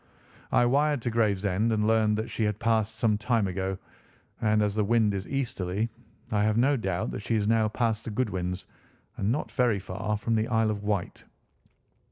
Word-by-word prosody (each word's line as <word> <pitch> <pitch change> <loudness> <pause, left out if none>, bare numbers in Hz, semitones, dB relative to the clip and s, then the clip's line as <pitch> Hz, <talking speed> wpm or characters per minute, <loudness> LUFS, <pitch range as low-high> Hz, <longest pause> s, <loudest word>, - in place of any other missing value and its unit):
I 120 - +4
wired 145 +1 +2
to 120 - -1
Gravesend 105 -1 +1
and 105 -1 +1
learned 110 -1 +3
that 110 - -2
she 115 - -1
had 105 -1 -1
passed 110 -1 +1
some 110 -2 +1
time 115 -1 +1
ago, 95 0 -2 0.6
and 105 -1 +3
as 105 -1 0
the 105 0 +1
wind 110 -1 +2
is 95 -1 -4
easterly 115 -6 -2 0.4
I 105 -2 +2
have 110 +1 +2
no 135 +4 +4
doubt 95 -7 -2
that - - -4
she 115 +2 -1
is 105 -1 +1
now 110 -1 +3
past 115 0 -1
the - - -4
Goodwins 95 -6 -2 0.5
and 100 +3 0
not 145 - -2
very 125 -5 +2
far 100 +3 -3
from 115 +2 -2
the 110 0 +1
Isle 110 -2 +2
of 105 -1 -4
Wight." 105 -4 -2
110 Hz, 195 wpm, -27 LUFS, 100-115 Hz, 0.6 s, I